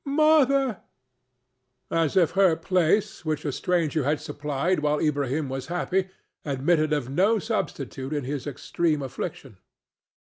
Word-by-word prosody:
Mother!" 275 -5 +3 1.1
as 165 +2 +1
if 175 -4 +4
her 190 -4 +4
place, 185 +5 +1
which 155 -2 -2
a 145 - 0
stranger 165 -1 0
had 145 +3 +1
supplied 150 +3 -1
while 150 0 +1
Ilbrahim 145 -1 0
was 130 0 -5
happy, 180 +2 -1 0.4
admitted 155 +3 +1
of 145 -5 0
no 195 +10 +3
substitute 150 - -3
in 145 -2 -1
his 140 +1 -4
extreme 150 +2 -1
affliction. 135 - -6
155 Hz, 130 wpm, -25 LUFS, 145-185 Hz, 1.1 s, if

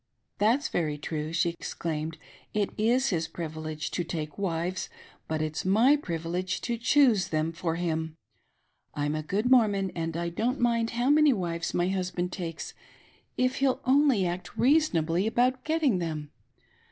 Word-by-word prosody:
" - - -51
That's 235 +8 +3
very 155 -4 -1
true," 150 +1 -4
she 170 +1 +1
exclaimed, 160 -1 -4 0.2
" - - -30
it 200 - -1
is 245 +5 +2
his 165 -4 -1
privilege 155 -2 -5
to 175 - -1
take 155 -3 -5
wives, 180 -1 -2 0.4
but 155 -1 -1
it's 155 -1 -3
m)t^ 240 +10 +4
privilege 175 - -3
to 240 - -1
choose 240 -5 +4
them 155 +1 -1
for 165 0 -2
him. 160 -2 -2 0.8
I'm 145 0 -1
a 155 - -2
good 205 +10 -1
Mormon 205 -6 +4
and 165 -1 -3
I 170 0 -1
don't 235 +10 -1
mind 235 -1 +2
how 250 +4 +3
many 300 -1 +6
wives 170 -5 -3
my 175 +1 +2
hus 185 -1 -1
band 180 0 -3
takes, 170 -3 -5 0.6
if 255 +1 +1
he'll 270 -2 +2
only 265 -6 +4
act 175 +1 -4
reasonably 200 - +3
about 250 +3 +1
getting 305 - +1
them. 155 -3 -4
180 Hz, 165 wpm, -28 LUFS, 165-240 Hz, 0.8 s, many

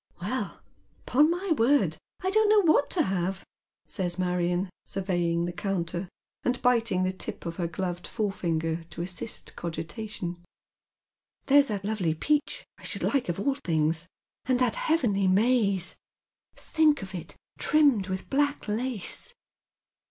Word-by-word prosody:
" - - -33
Well, - - -4 0.4
upon 295 +5 +4
my 355 +2 -2
word, 285 0 +3 0.3
I 375 0 0
don't 435 +1 +4
know 425 -1 +6
what 310 -5 +3
to 340 - +2
have," 190 -2 -2 0.4
saya 185 -4 -2
Marion, 180 0 0 0.2
survepng 175 -3 -1
the 175 - -2
counter, 175 -2 -3 0.3
and 245 0 0
biting 230 -7 +3
the 185 - +1
tip 185 - -6
of 170 0 -4
her 175 -2 -1
gloved 175 +1 -4
forefinger 170 -6 -1
to 170 - -6
assist 180 +4 -2
cogitation. 175 +1 -5 0.5
" - - -56
There's 285 0 +6
that 200 -3 -3
lovely 195 -7 0
peach, 295 - 0
I - - -17
aliould - - -2
like 275 -9 +1
of 175 - -2
all 275 +6 +1
things, 165 - 0 0.4
and 255 -1 +2
that 245 -3 +2
heavenly 225 -12 +1
maize. 200 -2 +3 0.6
Think 305 -7 +2
of 190 0 -8
it 165 -4 -7 0.2
trimmed 280 -11 +3
with 190 -1 -4
black 285 -1 0
lace." 245 - 0
195 Hz, 145 wpm, -27 LUFS, 175-270 Hz, 0.6 s, know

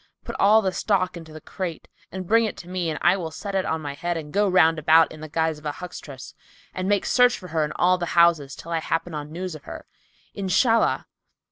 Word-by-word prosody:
Put - - -6
all 215 +2 +5
the 190 - 0
stock 185 -1 0
into 165 -2 -10
the 155 - -9
crate 180 -2 -6 0.2
and 190 -1 -6
bring 230 +5 +4
it 215 - -4
to 175 - -10
me 180 -2 -2
and 155 - -3
I 175 +2 +5
will 175 -4 -4
set 200 +6 -7
it 190 -1 0
on 160 0 -2
my 145 -1 -4
head 175 +4 -3
and 150 -2 -8
go 205 0 +2
round 165 -3 +4
about, 160 +2 +5
in 155 - -11
the 155 - -8
guise 160 0 -1
of 150 - -18
a 145 - -2
huckstress 145 -7 -9 0.4
and 185 +1 -3
make 205 -1 +1
search 245 -1 +4
for 180 - -11
her 160 -1 0
in 150 - -3
all 180 +1 +2
the 175 - -2
houses, 165 -5 +4
till 170 - -10
I 165 - +1
happen 165 +1 -2
on 150 0 -6
news 180 +2 -5
of 155 -2 -11
her— - - -9 0.5
Inshallah!" 225 +4 +2
170 Hz, 245 wpm, -24 LUFS, 155-190 Hz, 0.5 s, all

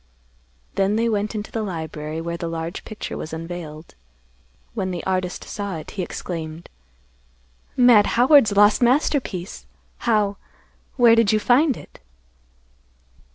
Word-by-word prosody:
Then 195 +1 +1
they 230 +1 +1
went 210 -1 -1
into 210 0 -5
the 225 - -2
library, 160 -4 -5
where 170 +1 -4
the 170 0 -4
large 165 0 -5
picture 215 - -6
was 155 - -6
unveiled. 165 -1 -7 0.8
When 195 -5 -2
the 175 -2 -4
artist 185 -1 -2
saw 200 -3 -5
it, 155 - -8
he 195 - -4
exclaimed, 165 -2 -6 1.1
"Mad 245 -5 +6
Howard's 245 -5 +5
lost 205 +2 +5
masterpiece! 245 - 0 0.3
How—where 225 +2 0
did 230 -3 +3
you 215 - +2
find 260 +5 +3
it?" - - -14
200 Hz, 125 wpm, -22 LUFS, 170-225 Hz, 1.1 s, Mad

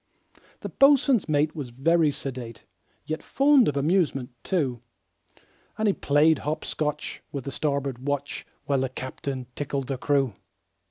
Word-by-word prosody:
The - - -5
boatswain's 275 - +4
mate 150 +1 +2
was 140 -5 -5
very 155 +6 +3
sedate, 130 -5 -6 0.4
Yet 155 +1 -3
fond 275 -2 +4
of 140 - 0
amusement, 145 -4 +1
too; 135 - -1 1.0
And 220 0 +1
he 200 - +4
played 150 0 +3
hop 155 +2 -3
scotch 150 -1 -3
with 140 -3 -4
the 140 - -5
starboard 140 -3 -1
watch, 140 +1 -3 0.2
While 140 -2 +1
the 130 0 0
captain 130 0 -5
tickled 140 -1 -3
the 135 -1 -4
crew. 135 -5 +1
145 Hz, 145 wpm, -26 LUFS, 135-160 Hz, 1.0 s, boatswain's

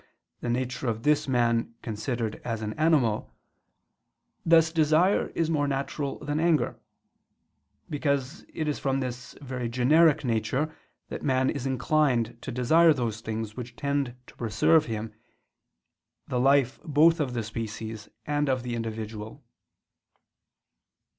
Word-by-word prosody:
the 120 - -4
nature 125 +2 -2
of 115 -1 -2
this 150 -1 +2
man 115 -2 +1
considered 115 0 -3
as 115 -2 -3
an 105 0 -3
animal; 145 -9 +1 1.1
thus 165 -1 +5
desire 160 +4 +3
is 165 - +1
more 150 -3 +1
natural 140 +1 -2
than 145 +1 -1
anger; 165 -2 +1 1.1
because 140 0 -2
it 155 - -3
is 150 - -1
from 135 -1 0
this 125 -1 -5
very 125 -3 -4
generic 145 +6 +4
nature 130 +6 -1 0.3
that - - -5
man 130 -1 +2
is 140 -2 -3
inclined 130 -3 +1
to - - -5
desire 155 +7 +5
those 115 -4 -3
things 110 -1 -4
which 120 -1 -7
tend 140 -3 -1
to - - -17
preserve 125 +8 +3
in - - -5
him 110 0 -5 1.1
the 125 - -1
life 135 -1 +3
both 165 +1 +4
of 130 -5 -1
the 120 - -1
species 110 0 -6 0.2
and 145 -1 0
of 130 -2 0
the 125 -1 -4
individual. 110 -1 -5
130 Hz, 135 wpm, -27 LUFS, 115-150 Hz, 1.1 s, thus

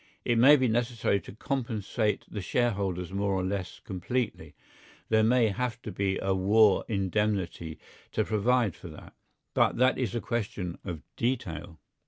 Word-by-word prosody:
It 120 -1 +2
may 140 +5 +9
be 130 -3 +2
necessary 115 -3 +1
to - - -11
compensate 110 -3 -1
the 105 - -5
shareholders 95 -4 -1
more 100 0 0
or 95 -1 0
less 95 -1 -3
completely; 95 - -3 0.5
there 110 -1 +4
may 115 0 +4
have 120 +2 -2
to 110 - -5
be 95 0 0
a 95 0 0
war 100 +2 +4
indemnity 95 -5 -1 0.4
to 110 - +2
provide 110 -2 +2
for 90 - -10
that, 75 -2 -12 0.4
but - - +3
that 130 +2 +3
is 120 -4 -1
a - - +1
question 105 -7 -3
of 85 -6 -6
detail. 85 - -2
105 Hz, 155 wpm, -28 LUFS, 95-120 Hz, 0.5 s, may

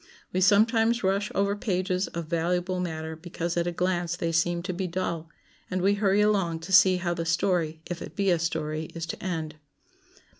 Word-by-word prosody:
We 185 - +1
sometimes 225 +4 +4
rush 195 +2 +1
over 200 +1 +1
pages 185 -2 -1
of 170 -1 -5
valuable 175 +3 -1
matter 160 -2 -4
because 170 +1 -4
at 170 0 0
a - - 0
glance 175 -1 -1
they 170 -1 -2
seem 170 +1 +1
to 185 0 -3
be 185 +1 -2
dull, 170 -2 -3 0.4
and 185 - -1
we 195 +2 +3
hurry 200 0 +2
along 195 -6 +1
to 185 +4 -6
see 185 -1 +7
how 175 -1 -1
the 170 -1 -3
story, 165 -1 0
if 175 -1 -5
it - - -8
be 195 -2 +2
a 170 - +2
story, 160 -1 -2
is 165 -1 -3
to - - -7
end. 160 -4 -3
175 Hz, 195 wpm, -27 LUFS, 165-190 Hz, 0.4 s, see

